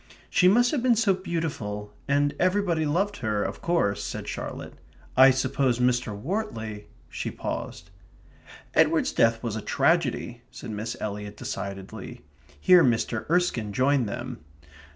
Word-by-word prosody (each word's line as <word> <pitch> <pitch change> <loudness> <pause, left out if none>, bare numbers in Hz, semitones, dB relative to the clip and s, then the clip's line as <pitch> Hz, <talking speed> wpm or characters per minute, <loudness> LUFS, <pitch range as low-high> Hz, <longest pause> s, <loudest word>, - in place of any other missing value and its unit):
"She 180 - +5
must 240 +6 +5
have 290 - 0
been 245 -1 +4
so 220 -3 +3
beautiful, 145 - -4
and 145 0 +2
everybody 180 -4 +1
loved 195 +7 0
her, 105 -4 -1
of - - -5
course," 135 -13 +1
said - - -5
Charlotte. - - -6 0.4
"I 130 +1 +8
suppose 130 -1 +1
Mr. 120 -4 0
Wortley 110 - -4
..." - - -30
she - - -4
paused. - - -6 0.8
"Edward's - - +3
death 115 0 +2
was 115 -3 -2
a 110 - -3
tragedy," 130 -7 0
said 115 - -8
Miss 110 +2 -4
Eliot 105 0 -5
decidedly. 95 -1 -6 0.4
Here 180 - +6
Mr. 115 -1 0
Erskine 160 - +1
joined 130 -1 +2
them. 120 +2 -6
130 Hz, 140 wpm, -26 LUFS, 110-175 Hz, 0.8 s, I